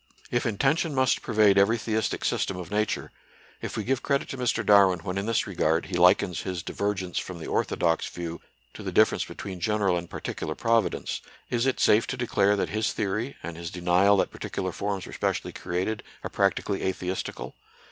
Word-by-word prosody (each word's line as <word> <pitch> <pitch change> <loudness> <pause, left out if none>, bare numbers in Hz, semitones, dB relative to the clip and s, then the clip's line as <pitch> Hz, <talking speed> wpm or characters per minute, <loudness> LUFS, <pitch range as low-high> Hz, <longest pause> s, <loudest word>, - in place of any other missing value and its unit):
If 120 +1 +1
intention 140 - +1
must 130 -1 +2
pervade 105 -3 +4
every 110 +4 +4
theistic 110 -1 -1
sys - - +1
tem 95 - -4
of 90 0 -7
Nature, 105 +1 -1 0.5
if - - -5
we 110 - -1
give 130 +3 0
credit 140 0 0
to 135 - -5
Mr. 125 -3 0
Darwin 95 -4 +5
when 90 +1 -4
in 100 +2 -2
this 115 -1 +1
regard 80 -4 +1
he 95 - -5
likens 90 0 +4
his 90 -3 -4
divergence 95 -3 -2
from 95 - -6
the 80 - -8
orthodox 85 -2 0
view 85 -1 -6 0.3
to - - -9
the - - -4
difference - - +3
be - - -10
tween 95 -3 -6
general 100 0 +1
and 85 0 -6
particular - - -4
Providence, 115 -6 0 0.3
is 120 +1 +1
it 135 - 0
safe 110 +2 +4
to 135 - -3
declare 105 -4 +2
that 100 - -1
his 110 +1 0
theory, 110 +6 -2
and 85 -1 -5
his 85 0 -6
denial 90 +4 +3
that - - +1
particular - - -4
forms 100 -2 -3
were - - -10
specially - - -2
created, 95 +5 -2 0.2
are - - -5
practically 100 0 0
atheistical? 95 0 -3
100 Hz, 195 wpm, -27 LUFS, 90-110 Hz, 0.5 s, Darwin